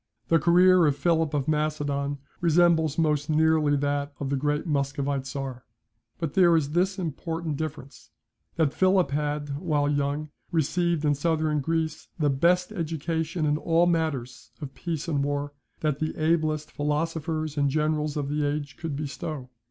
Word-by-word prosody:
The 165 Hz, -, +5 dB
career 180 Hz, +1 st, +5 dB
of 145 Hz, -, +2 dB
Philip 160 Hz, 0 st, +1 dB
of 140 Hz, -1 st, -1 dB
Macedon 145 Hz, -2 st, -1 dB, 0.2 s
resembles 165 Hz, -2 st, +3 dB
most 150 Hz, -2 st, +1 dB
nearly 155 Hz, -1 st, +3 dB
that 145 Hz, 0 st, -1 dB
of 140 Hz, -1 st, -3 dB
the -, -, +2 dB
great 145 Hz, +2 st, -1 dB
Muscovite 140 Hz, -2 st, -1 dB
Czar: 135 Hz, -2 st, -5 dB, 0.5 s
but 165 Hz, -4 st, -3 dB
there 175 Hz, -3 st, +5 dB
is 145 Hz, -2 st, -1 dB
this 185 Hz, +4 st, +1 dB
important 165 Hz, -2 st, -3 dB
difference, 145 Hz, -2 st, -7 dB, 0.5 s
that 160 Hz, -4 st, +1 dB
Philip 185 Hz, -4 st, +3 dB
had, 145 Hz, -1 st, -2 dB
while 150 Hz, -4 st, +1 dB
young, 145 Hz, +1 st, -1 dB, 0.2 s
received 170 Hz, 0 st, +1 dB
in 145 Hz, -, +4 dB
Southern 155 Hz, 0 st, 0 dB
Greece 160 Hz, +1 st, -2 dB
the 150 Hz, -4 st, +2 dB
best 180 Hz, +7 st, +2 dB
education 160 Hz, -2 st, -2 dB
in 150 Hz, 0 st, +1 dB
all 165 Hz, +1 st, +3 dB
matters 140 Hz, -8 st, -1 dB
of 140 Hz, -3 st, -7 dB
peace 165 Hz, -1 st, -4 dB
and 145 Hz, -4 st, 0 dB
war 145 Hz, 0 st, -2 dB, 0.3 s
that 150 Hz, -2 st, 0 dB
the 155 Hz, 0 st, -2 dB
ablest 155 Hz, -1 st, 0 dB
philosophers 155 Hz, +1 st, -2 dB
and 140 Hz, -1 st, +2 dB
generals 150 Hz, 0 st, 0 dB
of 145 Hz, -2 st, -2 dB
the 150 Hz, +1 st, -1 dB
age 145 Hz, 0 st, -2 dB
could 160 Hz, -4 st, -4 dB
bestow. 140 Hz, -1 st, -5 dB
150 Hz, 155 wpm, -26 LUFS, 145-165 Hz, 0.5 s, The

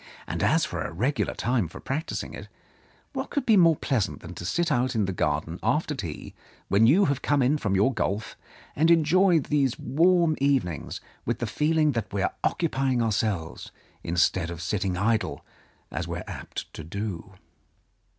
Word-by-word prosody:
And -, -, -4 dB
as -, -, +3 dB
for -, -, -4 dB
a -, -, -3 dB
regular 125 Hz, -, -1 dB
time 120 Hz, -6 st, 0 dB
for 80 Hz, -, -11 dB
practising 150 Hz, +5 st, -4 dB
it, -, -, -8 dB, 0.7 s
what -, -, -4 dB
could 285 Hz, -3 st, -2 dB
be 220 Hz, -, +5 dB
more 165 Hz, -4 st, +6 dB
pleasant 130 Hz, -8 st, -1 dB
than 85 Hz, -, -9 dB
to 85 Hz, -, -8 dB
sit 170 Hz, -, 0 dB
out 125 Hz, -2 st, +1 dB
in 105 Hz, -3 st, +2 dB
the 95 Hz, -, -2 dB
garden 80 Hz, +1 st, -1 dB
after 150 Hz, 0 st, +1 dB
tea, 85 Hz, -, -6 dB, 0.4 s
when 105 Hz, +3 st, +5 dB
you 185 Hz, -, +5 dB
have 140 Hz, -1 st, 0 dB
come 145 Hz, -2 st, +2 dB
in 145 Hz, +5 st, +2 dB
from 100 Hz, -6 st, 0 dB
your 105 Hz, +8 st, +3 dB
golf, 105 Hz, -2 st, -2 dB, 0.4 s
and 160 Hz, +3 st, +3 dB
enjoy 170 Hz, +3 st, +5 dB
these 140 Hz, -3 st, 0 dB
warm 170 Hz, +2 st, +3 dB
evenings, 130 Hz, -, 0 dB, 0.2 s
with 120 Hz, 0 st, -1 dB
the 120 Hz, -, -2 dB
feeling 150 Hz, +5 st, +2 dB
that 115 Hz, -5 st, -3 dB
we 100 Hz, -1 st, -1 dB
are -, -, 0 dB
occupying 135 Hz, -7 st, +1 dB
ourselves, 105 Hz, -7 st, -1 dB, 0.3 s
instead 85 Hz, +1 st, +1 dB
of 85 Hz, -1 st, -6 dB
sitting 95 Hz, +2 st, -1 dB
idle, 110 Hz, +3 st, 0 dB, 0.5 s
as -, -, -3 dB
we -, -, -3 dB
are -, -, -6 dB
apt -, -, -7 dB
to 80 Hz, -, -7 dB
do?" 95 Hz, +2 st, -5 dB
120 Hz, 180 wpm, -26 LUFS, 95-150 Hz, 0.7 s, more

